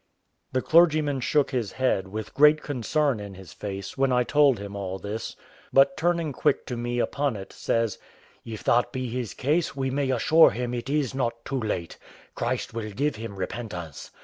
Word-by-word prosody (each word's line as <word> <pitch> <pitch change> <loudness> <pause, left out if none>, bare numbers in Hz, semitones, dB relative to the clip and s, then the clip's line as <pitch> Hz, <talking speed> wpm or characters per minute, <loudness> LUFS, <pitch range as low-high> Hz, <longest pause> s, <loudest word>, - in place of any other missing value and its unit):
The 130 0 0
clergyman 155 -4 +4
shook 145 +3 +1
his 120 -7 -2
head, 125 -7 0
with 110 +2 -6
great 150 +1 +5
concern 140 -1 0
in 100 -1 -8
his 95 -3 -12
face, 100 +3 -6
when 135 -1 +3
I 125 0 +3
told 145 -1 +4
him 100 0 -7
all 95 -1 -4
this; 105 +3 -5 0.4
but 135 +7 +5
turning 170 -3 0
quick 145 +1 +1
to 125 - -4
me 120 +1 -3
upon 140 +1 0
it, 95 -1 -8
says, 115 -3 -1 0.4
"If 110 -2 -7
that 120 +1 +2
be 130 -2 -3
his 120 -3 -4
case, 155 +3 0
we 135 -1 -1
may 140 0 0
assure 155 +6 +6
him 120 +4 -3
it 120 +1 -4
is 145 -4 0
not 120 -3 -2
too 135 -1 -2
late; 105 -7 -3 0.3
Christ 125 +1 -2
will 110 -2 -4
give 135 +5 -1
him 110 -2 -7
repentance. 90 -6 -6
125 Hz, 185 wpm, -26 LUFS, 105-140 Hz, 0.4 s, assure